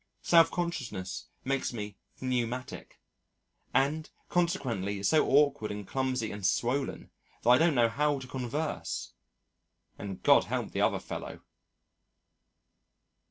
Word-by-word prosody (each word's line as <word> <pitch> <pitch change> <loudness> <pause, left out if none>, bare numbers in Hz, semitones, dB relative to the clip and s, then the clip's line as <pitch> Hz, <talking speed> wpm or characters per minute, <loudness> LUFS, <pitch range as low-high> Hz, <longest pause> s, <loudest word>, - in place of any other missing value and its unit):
Self 165 -1 +6
consciousness 120 - -4 0.2
makes 135 -1 -1
me 105 -3 -5 0.2
pneumatic, 125 -1 -3 0.7
and 155 +3 +1 0.2
consequently 115 - 0
so 155 +10 +4
awkward 140 -6 +3
and 105 -1 -6
clumsy 130 -4 -1
and 100 0 -7
swollen 120 +8 0 0.3
that 120 - +3
I 125 - +7
don't 165 -2 +4
know 120 -2 +5
how 145 +5 +1
to 135 - -7
converse 130 +4 -3 0.9
and 100 -2 -6
God - - +6
help - - -2
the - - -1
other - - +3
fellow. - - -7
130 Hz, 115 wpm, -30 LUFS, 105-145 Hz, 0.9 s, I